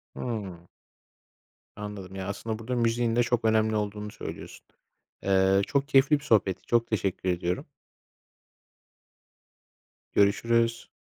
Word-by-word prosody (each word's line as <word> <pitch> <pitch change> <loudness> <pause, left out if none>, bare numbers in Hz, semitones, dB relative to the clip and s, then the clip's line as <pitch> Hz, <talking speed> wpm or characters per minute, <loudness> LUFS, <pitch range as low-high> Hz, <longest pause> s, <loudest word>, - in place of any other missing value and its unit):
Hımm. 95 -8 -5 1.1
Anladım 100 -2 -7
ya, 95 -1 -5
aslında 110 +2 -4
burada 125 +3 -3
müziğin 115 -1 +1
de 120 - +4
çok 120 -1 0
önemli 110 0 +3
olduğunu 105 0 -3
söylüyorsun. - - -9 0.6
Eee, 95 0 +3
çok 140 -1 0
keyifli 140 +2 +4
bir 145 - -16
sohbetti. 105 -8 +2
Çok 115 -1 +2
teşekkür 95 -3 -1
ediyorum. 90 0 -1 2.5
Görüşürüz. 115 +3 +2
110 Hz, 110 wpm, -27 LUFS, 95-115 Hz, 2.5 s, de